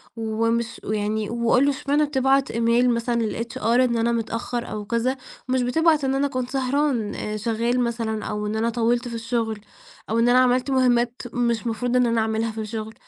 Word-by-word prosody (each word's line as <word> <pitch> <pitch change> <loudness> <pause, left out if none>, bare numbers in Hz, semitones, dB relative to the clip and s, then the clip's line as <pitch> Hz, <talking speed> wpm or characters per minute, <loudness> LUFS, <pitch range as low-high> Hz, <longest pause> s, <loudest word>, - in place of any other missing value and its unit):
ومش 230 +1 -1
ويعني 215 0 -2
وقل 235 +3 +2
له: 285 - +3
"اشمعنا 285 +2 0
بتبعَت 270 -1 +2
email 235 +2 +2
مثلًا 235 0 0
للHR 235 +3 -5
إن 235 +1 +3
أنا 230 +1 +1
متأخّر 235 +1 -3
أو 210 -1 -5
كذا، 235 +4 0 0.3
ومش 260 0 +2
بتبعَت 310 +4 +2
إن 270 0 +1
أنا 280 +1 +1
كنت 255 -2 -3
سهران، 265 -4 0
آآ، 210 0 -4
شغَّال 230 +3 0
مثلًا، 230 -3 -2
أو 210 0 -3
إن 210 - -2
أنا 225 +1 +1
طوَّلت 240 +1 0
في 235 - -5
الشغل، 230 -1 -2 0.5
أو 225 - +1
إن 235 +1 +4
أنا 250 +1 +5
عملت 255 +1 +2
مُهمَّات 245 -2 +2
مش 235 -1 0
مفروض 235 +2 -1
إن 250 0 +4
أنا 230 -1 +1
اعملها 220 +1 -1
في 220 0 -5
الشغل." 220 0 -5
235 Hz, 190 wpm, -23 LUFS, 225-255 Hz, 0.5 s, أنا